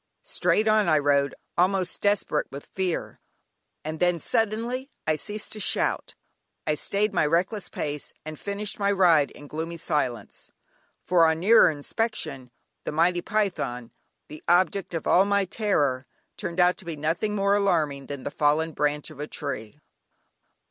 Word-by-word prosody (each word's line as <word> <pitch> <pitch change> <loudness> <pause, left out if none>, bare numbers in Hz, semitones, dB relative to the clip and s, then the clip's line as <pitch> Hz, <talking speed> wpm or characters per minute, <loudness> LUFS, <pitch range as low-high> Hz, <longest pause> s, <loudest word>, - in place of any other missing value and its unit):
Straight 215 - +1
on 215 -2 +4
I 155 -2 +4
rode, 140 -1 +2 0.2
almost 185 0 +1
desperate 200 -7 +1
with 140 +1 -8
fear, 185 -3 -3 0.7
and 155 0 -4
then 175 -1 +3
suddenly 230 - -1 0.2
I 155 - +2
ceased 210 +7 -4
to 215 - -6
shout, - - 0 0.5
I 155 - +2
stayed 200 +7 0
my 175 - +2
reckless 180 +7 0
pace, 150 -1 -4
and 155 -1 -7
finished 205 +2 -4
my 200 0 +2
ride 170 -7 +4
in 145 - -13
gloomy 160 +3 -5
silence, 145 -8 -3 0.5
for 170 -2 +4
on 160 0 +1
nearer 215 +6 +6
inspection 145 - -2 0.3
the - - -3
mighty 175 +3 +2
python, 175 - -2 0.4
the 150 - -10
object 180 +1 +2
of 165 - -3
all 185 - +5
my 200 0 +2
terror, 145 - 0 0.3
turned 170 +1 -5
out 180 0 +4
to - - -10
be 165 -2 -4
nothing 165 +8 -1
more 200 0 +2
alarming 155 -9 +1
than 140 -2 -6
the - - -4
fallen 150 +3 +1
branch 150 0 -1
of 150 - -13
a 150 - -4
tree. 135 -7 -5
170 Hz, 155 wpm, -26 LUFS, 150-200 Hz, 0.7 s, nearer